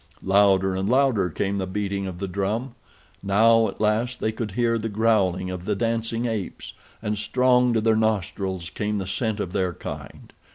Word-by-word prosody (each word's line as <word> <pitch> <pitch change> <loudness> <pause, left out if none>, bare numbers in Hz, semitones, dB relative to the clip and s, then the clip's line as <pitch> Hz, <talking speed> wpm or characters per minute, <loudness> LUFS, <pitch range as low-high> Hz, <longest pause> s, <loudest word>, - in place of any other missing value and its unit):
Louder 95 -1 +3
and 95 +2 -1
louder 125 -8 +3
came 100 +4 -2
the 95 - -2
beating 100 0 -2
of 90 -2 -6
the 100 +2 -4
drum. 105 +7 -2 0.5
Now, 110 +3 +4
at - - -7
last, 110 +4 0
they 110 - 0
could 110 -2 -5
hear 115 0 +1
the 115 +1 -3
growling 100 -4 +1
of 90 -1 -6
the 105 - 0
dancing 115 +1 -1
apes, 110 -6 -4 0.3
and 105 -1 -2
strong 125 +2 +3
to 110 - +2
their 110 0 +3
nostrils 95 -4 -1
came 105 0 -2
the 95 - -3
scent 110 +3 -2
of 95 -4 -3
their 95 -3 0
kind. - - -9
105 Hz, 180 wpm, -24 LUFS, 95-115 Hz, 0.5 s, Now